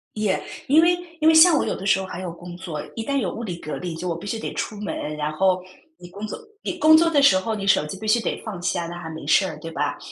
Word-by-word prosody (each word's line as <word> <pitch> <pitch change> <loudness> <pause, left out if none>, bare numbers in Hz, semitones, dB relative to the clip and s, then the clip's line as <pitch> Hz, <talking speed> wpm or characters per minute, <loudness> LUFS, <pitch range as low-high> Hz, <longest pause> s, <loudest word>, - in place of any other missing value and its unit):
也 210 -3 0 0.3
因 300 +4 +6
为 350 +1 +4 0.2
因 310 - +3
为 320 - +7
像 320 0 +8
我 - - +1
有 - - -1
的 190 - -7
时 195 - +4
候 190 - -4
还 185 -1 -7
有 180 -2 -4
工 175 +1 -10
作。 170 -5 -5
一 225 - -3
旦 280 +3 -1
有 200 -10 -1
物 235 - -6
理 180 -6 -4
隔 155 -2 -6
离 180 -2 -5
就 170 +1 -3
必 170 +4 -9
须 220 +2 -3
得 - - -5
出 210 - -4
门， 155 -7 -4
然 150 0 -2
后 185 +3 +2 0.4
你 175 - -12
工 200 +4 -7
作 215 - -6 0.2
你 - - -3
工 315 0 +7
作 335 +1 +4
的 295 -3 +3
时 195 -9 +6
候， 220 +4 -2
你 200 -2 -4
手 175 - +4
机 185 +5 -7
必 215 - -6
须 230 +2 +3
得 - - -3
放 195 -6 -6
下， 175 -1 -1
那 175 - -7
还 170 -2 -7
没 160 -3 -8
事 190 - +4
儿， 155 -5 -6
对 165 - -7
吧？ - - -2
190 Hz, 320 characters per minute, -23 LUFS, 175-225 Hz, 0.4 s, 像